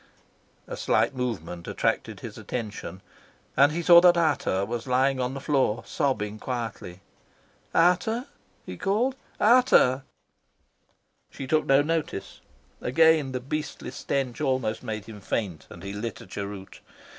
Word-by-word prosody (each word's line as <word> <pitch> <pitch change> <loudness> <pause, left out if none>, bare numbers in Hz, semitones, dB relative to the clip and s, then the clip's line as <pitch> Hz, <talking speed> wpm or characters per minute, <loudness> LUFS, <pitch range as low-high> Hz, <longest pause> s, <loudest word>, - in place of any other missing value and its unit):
A - - -6
slight - - +1
movement 90 -9 -4
attracted - - -1
his - - -8
attention, 105 -6 -6 0.5
and 140 +2 +5
he 170 +3 -2
saw 170 0 +9
that 175 -1 +6
Ata 145 - +1
was 120 +1 -4
lying 130 +1 +2
on 125 +1 -2
the - - -4
floor, 135 -6 +1
sobbing 110 -7 -1
quietly. 115 -8 -5 0.7
"Ata," 180 +8 +2 0.4
he - - -7
called. 225 +7 0 0.2
"Ata." 215 - +5 1.3
She 135 - -7
took 155 +3 +1
no 135 +1 +5
notice. 160 -8 -3 0.4
Again 155 +1 +4
the 130 - -2
beastly 150 +4 -5
stench 135 -1 -3
almost 130 -6 0
made 110 -4 -5
him 105 -2 -10
faint, 100 -5 -3
and - - -12
he 100 0 -5
lit 105 +2 -5
a - - -11
cheroot. 100 0 -7
130 Hz, 135 wpm, -26 LUFS, 110-155 Hz, 1.3 s, saw